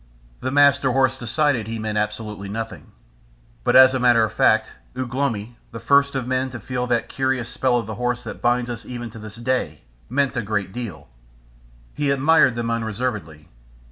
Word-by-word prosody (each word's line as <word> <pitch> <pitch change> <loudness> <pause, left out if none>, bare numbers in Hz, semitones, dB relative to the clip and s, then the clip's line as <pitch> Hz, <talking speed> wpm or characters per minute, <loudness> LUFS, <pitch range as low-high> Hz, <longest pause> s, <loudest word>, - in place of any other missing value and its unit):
The 130 - -3
Master 140 -2 +4
Horse 130 0 +2
decided 125 -1 0
he 115 0 -4
meant 110 -1 -3
absolutely 105 -1 -3
nothing. 115 +2 -6 0.7
But 120 - +2
as 130 0 +8
a 130 - 0
matter 120 -2 +4
of 110 - -2
fact, - - +3 0.3
Ugh 130 -2 -4
lomi, 120 -4 -2
the 115 - -7
first 140 +4 +3
of 130 -2 -2
men 130 +1 0
to 125 -2 -7
feel 125 +3 -3
that 120 -2 0
curious 130 -3 -1
spell 130 -2 +1
of 115 - -2
the 110 - -5
horse 125 0 -1
that - - -8
binds 120 0 +1
us 115 -2 -6
even 120 -2 -7
to 115 - -10
this 105 0 -9
day, 125 +2 -2 0.3
meant 135 +1 0
a 120 - 0
great 100 -3 -3
deal. 120 -6 -7 0.9
He 145 -1 -1
admired 140 -2 +4
them 115 -1 -2
unreservedly. 110 -9 -3
120 Hz, 185 wpm, -22 LUFS, 110-130 Hz, 0.9 s, as